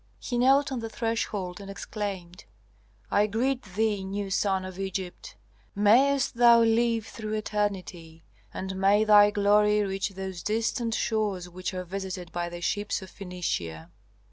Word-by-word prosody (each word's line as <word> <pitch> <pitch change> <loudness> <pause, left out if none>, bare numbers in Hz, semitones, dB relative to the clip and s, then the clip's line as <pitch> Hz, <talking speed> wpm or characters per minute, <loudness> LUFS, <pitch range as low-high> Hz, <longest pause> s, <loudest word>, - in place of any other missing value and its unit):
He 245 -2 -3
knelt 275 +3 +4
on 260 - -2
the 225 -1 -5
threshold 210 -5 -3
and 195 - -9
exclaimed, 195 - -6 0.7
"I 205 +1 +3
greet 250 +5 0
thee, 205 0 -1
new 195 +1 -4
sun 190 -1 +1
of 185 0 -8
Egypt! 190 - -5 0.4
Mayst 245 +6 +3
thou 235 -1 +7
live 230 0 +2
through 215 -1 -6
eternity, 190 -6 -3 0.3
and 190 0 -5
may 200 +2 +4
thy 210 -1 +7
glory 210 +1 +3
reach 195 0 -2
those 190 -2 -6
distant 225 +2 -1
shores 205 -5 -1
which 185 +1 -5
are 185 - -3
visited 185 -1 -5
by 175 0 -3
the 175 0 -8
ships 205 +2 -1
of 190 - -12
Phœnicia." 90 - -4
205 Hz, 145 wpm, -27 LUFS, 185-220 Hz, 0.7 s, thou